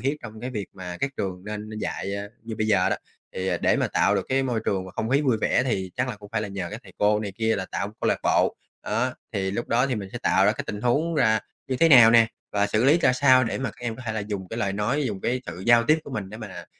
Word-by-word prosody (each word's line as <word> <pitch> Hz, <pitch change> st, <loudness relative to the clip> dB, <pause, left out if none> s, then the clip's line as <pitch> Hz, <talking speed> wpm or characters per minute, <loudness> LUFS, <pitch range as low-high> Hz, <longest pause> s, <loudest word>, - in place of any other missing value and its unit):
thiết 140 Hz, +3 st, 0 dB
trong 110 Hz, -1 st, -9 dB
cái 125 Hz, +2 st, -4 dB
việc 105 Hz, -5 st, -4 dB
mà 90 Hz, -2 st, -7 dB
các 140 Hz, -, 0 dB
trường 90 Hz, -1 st, -4 dB
nên 105 Hz, 0 st, -6 dB
nên 110 Hz, -, -7 dB
dạy, 100 Hz, -2 st, -3 dB
a, 100 Hz, -, -5 dB, 0.2 s
như 115 Hz, -1 st, -6 dB
bây 110 Hz, -, 0 dB
giờ 100 Hz, -4 st, +3 dB
đó. -, -, 0 dB, 0.4 s
Thì, 95 Hz, 0 st, -2 dB
à, 90 Hz, -, +1 dB
để -, -, +2 dB
mà -, -, +1 dB
tạo -, -, +2 dB
được -, -, -1 dB
cái 135 Hz, +1 st, +2 dB
môi 120 Hz, -4 st, -1 dB
trường 95 Hz, -2 st, 0 dB
và 95 Hz, -, -9 dB
không 110 Hz, -, -3 dB
khí 140 Hz, -, +4 dB
vui 130 Hz, -6 st, +2 dB
vẻ 125 Hz, -, +2 dB
thì 95 Hz, -7 st, -2 dB
chắc 125 Hz, +1 st, 0 dB
là 115 Hz, -, -4 dB
cũng 105 Hz, 0 st, -13 dB
phải 115 Hz, -1 st, 0 dB
là 105 Hz, -, -4 dB
nhờ 95 Hz, -3 st, -4 dB
các 110 Hz, +3 st, -7 dB
thầy -, -, -15 dB
cô 105 Hz, +1 st, +3 dB
này 100 Hz, -2 st, -4 dB
kia 110 Hz, +2 st, 0 dB
là 95 Hz, -1 st, -3 dB
tạo 100 Hz, -, -2 dB
câu -, -, +1 dB
lạc -, -, +1 dB
bộ -, -, +2 dB, 0.3 s
đó, 110 Hz, +2 st, -1 dB
á, 130 Hz, -, -2 dB, 0.2 s
thì 95 Hz, -3 st, -1 dB
lúc 115 Hz, +5 st, -3 dB
đó 125 Hz, +3 st, +3 dB
thì 130 Hz, -, -1 dB
mình 100 Hz, -4 st, -5 dB
sẽ 120 Hz, -, -4 dB
tạo 95 Hz, -, +3 dB
ra 105 Hz, -, +4 dB
cái -, -, -5 dB
tình 105 Hz, -, -5 dB
huống 145 Hz, +8 st, +1 dB
ra 110 Hz, -7 st, +3 dB, 0.3 s
như 130 Hz, -, -1 dB
thế 165 Hz, +5 st, +5 dB
nào 120 Hz, -6 st, +9 dB
nè 115 Hz, -1 st, +6 dB, 0.3 s
và 100 Hz, 0 st, +2 dB
xử 110 Hz, +3 st, +1 dB
lý 150 Hz, +6 st, +5 dB
ra 130 Hz, -6 st, +4 dB
sao 130 Hz, -1 st, +5 dB
để 115 Hz, -, -2 dB
mà 130 Hz, -3 st, -2 dB
các 125 Hz, -, -20 dB
em 115 Hz, -2 st, -3 dB
có 130 Hz, -, -9 dB
thể 110 Hz, -, -1 dB
là 110 Hz, -, -2 dB
dùng 100 Hz, -3 st, -5 dB
cái 115 Hz, -, -5 dB
lời 100 Hz, -4 st, 0 dB
nói, 120 Hz, +9 st, 0 dB
dùng 100 Hz, -4 st, -4 dB
cái 125 Hz, +5 st, -1 dB
sự 90 Hz, -, -7 dB
giao 120 Hz, -1 st, +6 dB
tiếp 155 Hz, +5 st, +4 dB
của -, -, -9 dB
mình 105 Hz, -7 st, -4 dB
để 110 Hz, -, -8 dB
mà, 110 Hz, -5 st, -8 dB
110 Hz, 320 wpm, -25 LUFS, 100-125 Hz, 0.4 s, nào